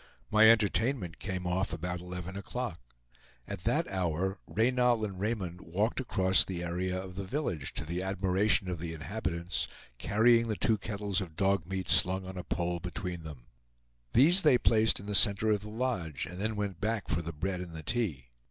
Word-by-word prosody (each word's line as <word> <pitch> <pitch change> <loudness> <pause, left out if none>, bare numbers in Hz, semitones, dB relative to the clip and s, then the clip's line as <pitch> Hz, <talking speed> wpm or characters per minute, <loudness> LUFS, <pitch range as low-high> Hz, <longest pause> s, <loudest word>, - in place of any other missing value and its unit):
My 110 +1 +7
entertainment 110 -3 +2
came 95 -1 -4
off 90 +2 0
about 90 +2 -4
eleven 90 +1 -7
o'clock. 100 -1 -5 0.7
At 100 -3 -6
that 150 +9 +1
hour, 95 +1 -1
Reynal 120 0 +2
and 95 -3 -7
Raymond 95 -5 -3
walked 100 +8 -1
across 95 -7 +3
the 90 -2 -4
area 90 +2 -2
of 95 -1 -8
the 100 +2 -5
village, 95 - -3
to 80 - -3
the 85 +3 -3
admiration 95 +1 +2
of 90 -3 -3
the 80 0 -4
inhabitants, 85 0 -3 0.3
carrying 115 +2 +3
the 110 - -1
two 110 0 +1
kettles 100 -1 -2
of 85 -4 -7
dog 95 -2 +1
meat 95 -1 -3
slung 95 +1 +3
on 95 0 -8
a 90 - -5
pole 85 0 -2
between 90 0 -5
them. 75 -6 -10 0.7
These 170 +10 +7
they 150 -7 +5
placed 110 -2 +3
in 100 - -10
the 105 - -4
center 100 +2 +6
of 105 -2 +1
the 105 - -8
lodge, 105 - -2
and 90 +2 -8
then 110 +1 -1
went 100 -3 -4
back 110 -1 -1
for 85 - -1
the 85 +1 -5
bread 90 +4 -3
and 85 -2 -8
the 80 - -7
tea. 80 - -2
95 Hz, 190 wpm, -30 LUFS, 90-110 Hz, 0.7 s, My